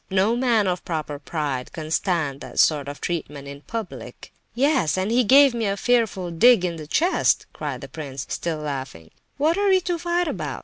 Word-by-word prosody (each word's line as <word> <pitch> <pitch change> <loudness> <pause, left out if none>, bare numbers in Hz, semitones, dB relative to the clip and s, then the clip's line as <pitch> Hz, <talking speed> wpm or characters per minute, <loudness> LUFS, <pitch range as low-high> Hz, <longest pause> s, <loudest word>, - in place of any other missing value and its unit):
No 195 +4 +2
man 240 -4 +2
of 180 -1 -1
proper 155 -3 -4
pride 145 -4 -3
can 155 -2 -7
stand 160 -6 0
that - - -10
sort 145 -3 +3
of 145 0 -7
treatment 150 -5 -4
in 140 0 -9
public." 225 +3 -8 0.2
"Yes, 260 - +2
and 190 +3 -1
he 245 +2 +3
gave 275 +3 +6
me 230 -3 -1
a 200 0 -1
fearful 220 -7 +1
dig 195 +3 +5
in 170 -2 -3
the 155 -2 -8
chest," 340 - +2
cried 140 -4 -5
the 135 - -7
prince, 140 -3 -7
still 170 -2 -3
laughing. 135 - -6 0.3
"What 315 +6 +2
are 405 0 +2
we 380 -1 +5
to 350 -1 -2
fight 345 +1 0
about? - - -4
180 Hz, 195 wpm, -23 LUFS, 150-240 Hz, 0.3 s, gave